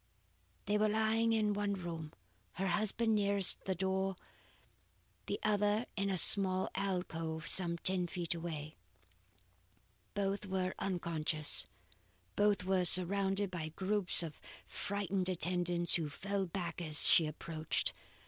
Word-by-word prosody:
'" - - -38
They 210 0 0
were 215 0 +2
lying 220 +1 0
in 215 -2 0
one 205 0 -2
room, 165 -4 -7 0.4
her 190 +1 -3
husband 215 +4 -1
nearest 200 -2 +2
the 190 - -2
door, 190 +1 -2 1.1
the - - -4
other 210 +2 0
in 200 -1 -2
a 190 - -1
small 190 0 +6
alcove 165 -4 -4
some 170 -2 +1
ten 180 0 0
feet 175 0 -4
away. 160 -3 -7 1.4
Both 200 0 -3
were 190 -1 -3
unconscious; 165 -4 -1 0.7
both 205 -1 +1
were 190 0 0
surrounded 195 +2 +4
by 165 -3 -5
groups 190 +1 +1
of 160 -3 -9 0.2
frightened 195 -2 -3
attendants 175 -1 +2
who 160 -3 +3
fell 195 +5 -4
back 175 -1 -6
as 155 -3 +5
she 160 - +5
approached. 155 +1 -2
190 Hz, 130 wpm, -33 LUFS, 170-200 Hz, 1.4 s, small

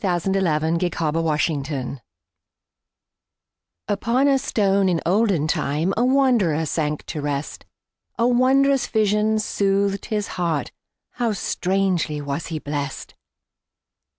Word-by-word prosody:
Isaacs 185 0 0
Pillow 185 -6 +2
and 170 +2 0 0.4
Stone 140 -4 -2 1.9
UPON 235 +7 +1
a 275 -1 +3
stone 200 -6 +1
in 170 -2 +1
olden 190 -4 +2
timeA 160 +2 0
wanderer 245 - +2
sank 150 -1 -2
to 155 - -5
rest.A 145 - -5
wondrous 265 +2 +3
vision 215 0 +1
soothed 200 -1 0
his 210 -2 -2
heartHow 180 +6 -4
strangely 180 -4 -1
was 145 +2 -4
he 165 - -4
blessed! 145 -2 -5
190 Hz, 95 wpm, -22 LUFS, 155-215 Hz, 1.9 s, a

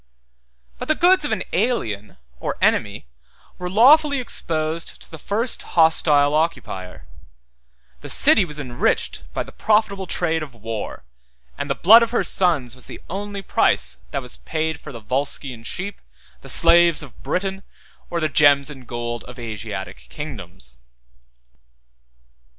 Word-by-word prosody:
But - - -5
the 310 - +2
goods 355 -2 +4
of - - -2
an - - -1
alien 145 - -1 0.2
or - - -3
enemy - - +1 0.5
were 180 0 -4
lawfully 280 - +5
exposed 160 -8 -2
to - - -14
the 160 - -9
first 225 - -1 0.2
hostile 150 -3 +4
occupier; 150 - -2 0.9
the - - -9
city 205 - +5
was 150 -4 -7
enriched 120 - -1
by - - -1
the - - -13
profitable 210 -3 +1
trade 165 -2 -1
of 140 -5 -8
war; 115 -1 -6 0.5
and - - -5
the - - 0
blood 225 +6 +8
of 230 - +1
her 240 - 0
sons 150 -10 +1
was 130 -1 -6
the - - -9
only 200 +1 -5
price 65 - +1
that 140 - -3
was 125 - -7
paid 160 -1 -3
for - - -10
the 115 -3 -9
Volscian 130 -1 -2
sheep, 195 - -5 0.4
the 135 - -11
slaves 170 +1 +5
of 135 - -14
Briton, 190 +7 -2 0.5
or 170 - -2
the 155 - +1
gems 145 -1 +4
and 130 -4 -12
gold 120 -1 -4
of 125 +1 -11
Asiatic 105 -5 -7
kingdoms. 90 - -8
155 Hz, 145 wpm, -21 LUFS, 120-190 Hz, 0.9 s, blood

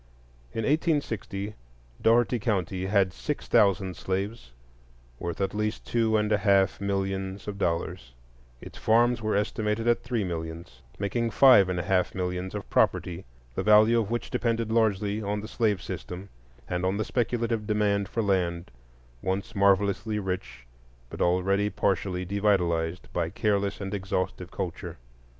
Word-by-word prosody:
In 115 - -3
1860, 115 - -1 0.5
Dougherty 120 +1 +3
County 95 -3 -1
had 95 -2 +2
six - - -4
thousand 95 -2 +3
slaves, 95 - -3 0.7
worth 85 -2 -4
at 95 -1 -1
least 105 +1 -2
two 115 -2 +2
and 105 0 0
a 105 - +3
half 95 -2 +3
millions 95 -1 -2
of 100 -1 -5
dollars; 85 -7 -2 0.5
its - - -10
farms 120 +1 +3
were 110 -1 0
estimated 105 +2 -1
at 120 - +3
three 120 -3 -1
millions,—making 85 - -4
five 115 -8 +6
and 90 -1 -1
a - - -2
half 90 +1 +1
millions 90 +1 -3
of 100 - -5
property, 90 0 +1 0.3
the - - -2
value 110 +2 +6
of 105 -3 -2
which 120 0 -3
depended 115 -2 0
largely 105 -2 +1
on 105 0 -2
the 110 - -7
slave 110 -4 0
system, 95 +3 -7 0.4
and 90 0 -2
on 95 +2 +1
the 110 - -1
speculative 115 -3 -1
demand 100 -2 +1
for 115 - -1
land 90 -4 0 0.5
once 95 +4 -2
marvellously 100 +2 +2
rich 95 -10 -4 0.5
but - - -6
already 95 +3 +2
partially 95 -2 -1
devitalized 90 -4 +1
by 85 -2 0
careless 100 +1 0
and 100 0 -5
exhaustive 95 -2 -2
culture. 95 -4 -5
100 Hz, 145 wpm, -27 LUFS, 95-110 Hz, 0.7 s, five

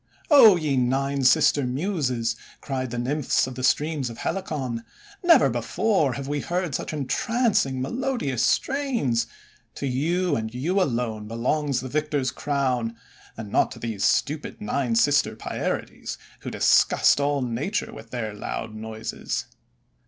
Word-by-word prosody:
c<0 225 -11 +8
ye 150 -4 0
Nine 135 +2 +1
Sister 145 +1 +4
Muses," 125 - -1 0.2
cried 130 -2 -3
the 120 - -5
Nymphs 135 +4 +1
of 130 - -6
the 130 +1 -6
streams 145 0 +1
of 115 - -9
Helicon, 135 -12 -3 0.4
"never 345 -1 +6
before 190 - +1
have 135 +2 -5
we 145 +1 -1
heard 175 0 -2
such - - -3
entrancing, 180 - 0
melodious 235 - -1
strains! 235 - +1 0.5
To - - -4
you, 160 +6 0
and 110 -2 -3
to 120 - -8
you 180 +9 +1
alone, 115 -8 -1
belongs 130 +5 0
the 130 - -5
victor's 145 -2 -1
crown, 130 -5 -1 0.4
and 105 -2 -7
not - - +3
to - - -12
these 110 -4 -3
stupid 150 +2 0
Nine 115 +3 -1
Sister 145 +5 +3
Pierides - - -4 0.2
who - - -6
disgust - - +4
all 140 -1 +1
nature 130 - -2
with 110 +1 -11
their 110 -4 -4
loud 110 +1 -5
noises. 110 0 -4
135 Hz, 145 wpm, -25 LUFS, 120-155 Hz, 0.5 s, c<0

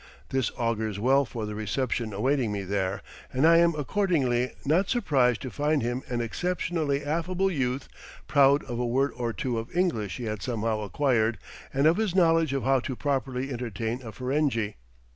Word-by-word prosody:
This 130 -2 0
augurs 110 -3 -1
well 135 +5 +3
for 115 -3 -5
the 105 - -5
reception 110 +2 -2
awaiting 120 +3 0
me 100 -1 -3
there, 95 0 -2 0.3
and 130 +3 +2
I 165 +1 +7
am 170 -1 +4
accordingly 140 - +1
not 170 +7 +2
surprised 135 - +2
to 130 - -5
find 150 -2 +1
him 120 +2 -1
an 120 -1 -2
exceptionally 150 +1 -1
affable 180 +5 0
youth, 130 -4 -1 0.4
proud 140 0 +5
of 120 -2 -5
a 125 - 0
word 135 +4 +1
or 120 -2 -2
two 115 +3 -2
of 115 - -7
English 115 - 0
he 125 - -6
had 110 -3 -3
somehow 110 0 -1
acquired, 110 0 +1 0.3
and 140 +2 +1
of 160 +3 +5
his 215 -5 0
knowledge 165 -4 +4
of 135 -1 -1
how 135 0 +3
to 130 +1 -4
properly 135 -1 -2
entertain 115 0 -3
a 115 -3 -8
Ferenghi. 125 -3 -1
130 Hz, 180 wpm, -27 LUFS, 115-150 Hz, 0.4 s, I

